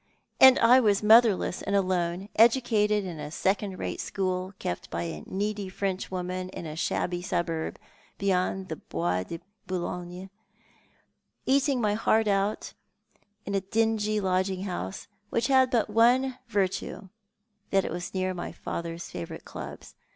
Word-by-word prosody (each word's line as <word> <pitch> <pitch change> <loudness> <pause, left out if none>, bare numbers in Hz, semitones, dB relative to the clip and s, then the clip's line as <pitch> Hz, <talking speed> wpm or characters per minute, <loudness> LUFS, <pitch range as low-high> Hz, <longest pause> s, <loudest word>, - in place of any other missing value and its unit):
" - - -47
And 265 -1 +10
I 245 +3 +6
was 210 -4 +2
motherless 220 -4 +5
and 200 - -1
alone, 185 -1 0
educated 220 -3 +4
in 170 -4 -6
a 150 - -5
second 190 +3 -1
rate - - -4
school, 185 0 -2
kept 90 - -4
by 85 0 -3
a 80 -2 -5
needy 205 0 -2
French 190 0 -3
woman 185 0 -4
in 180 - -7
a 155 -1 -6
shabby 175 +2 -1
suburb 170 -3 -2 0.4
beyond 190 -1 0
the 160 - -4
Bois 90 +2 -2
de 165 - -6 0.3
Boulogne, 180 0 -4
and 190 - -10 1.2
eating 275 0 +2
my 210 -3 +1
heart 220 0 +2
out 200 +1 0 0.7
in 200 - -4
a 195 - +1
dingy 215 +1 +1
lodging 190 0 0
house, 175 - -5 0.2
which 230 +2 0
had 260 -1 +5
but 235 -4 +2
one 245 +4 +3
virtue, 195 -2 -2 0.6
that 195 -1 +2
it - - -3
was 175 +1 -5
near 185 0 0
my 175 - -5
father's 170 0 -6
favourite 85 -2 -7
clubs. - - -9
190 Hz, 150 wpm, -27 LUFS, 180-215 Hz, 1.2 s, And